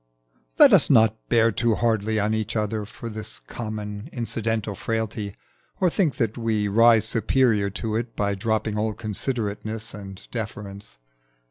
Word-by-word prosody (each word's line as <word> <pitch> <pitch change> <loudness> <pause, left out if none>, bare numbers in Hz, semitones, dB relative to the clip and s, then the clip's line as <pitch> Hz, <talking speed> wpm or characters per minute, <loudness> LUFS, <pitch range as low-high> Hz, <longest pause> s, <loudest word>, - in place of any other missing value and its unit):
Let - - +8
us - - +6
not 110 -1 +5
bear 115 -1 +4
too 115 +2 +1
hardly 110 -2 +1
on 105 +1 +1
each 110 -1 -2
other 105 -1 -1
for 115 - -9
this 110 -1 -6
common 105 +1 -6
incidental 115 -3 -2
frailty, 110 -1 -3 0.4
or 180 -3 +3
think 170 -6 +1
that 115 -3 -1
we 110 -3 0
rise 115 +2 +5
superior 115 -4 +2
to 110 +2 -3
it 115 0 -4
by 100 -1 0
dropping 110 +1 -1
all 110 0 -1
considerateness 110 0 -3
and 95 -2 -9
deference. 100 - -6
110 Hz, 145 wpm, -24 LUFS, 105-115 Hz, 0.4 s, Let